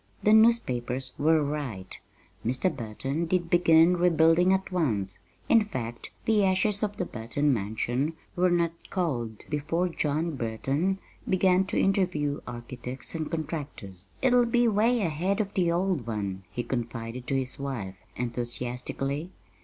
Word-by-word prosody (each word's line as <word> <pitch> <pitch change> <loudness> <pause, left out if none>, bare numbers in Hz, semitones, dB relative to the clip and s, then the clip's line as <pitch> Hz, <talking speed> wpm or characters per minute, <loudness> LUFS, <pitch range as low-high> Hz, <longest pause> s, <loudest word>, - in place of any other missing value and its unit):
The 210 - +5
newspapers 130 - +3
were 155 +1 +4
right 140 -11 -4 0.4
Mr. 130 +10 0
Burton 135 +7 -3
did 175 -1 0
begin 175 0 +5
rebuilding 170 +1 +4
at 190 0 0
once; 105 - 0 0.3
in 225 -2 +5
fact, 120 - -5 0.2
the 215 -2 +3
ashes 195 +2 +2
of 205 -2 -2
the - - -1
Burton 130 +6 0
mansion 120 +7 -1 0.2
were 180 +1 +3
not 170 -1 +2 0.2
cold 120 - -2
before 155 +4 -1
John 155 0 -1
Burton 135 +10 -1 0.3
began 185 0 +4
to - - -1
interview 180 -7 +1
architects 120 +2 -6
and 160 -2 -3
contractors. 145 - -5 0.2
"It'll 245 -2 +5
be 240 +1 +3
'way 225 +3 +3
ahead 180 +4 0
of 205 -2 -1
the 175 -3 +2
old 175 - 0
one," 100 -4 -3
he 120 - -3
confided 120 0 -4
to 135 - 0
his 130 0 -3
wife 120 -9 -4 0.2
enthusiastically. 125 +5 -3
150 Hz, 140 wpm, -28 LUFS, 120-185 Hz, 0.4 s, The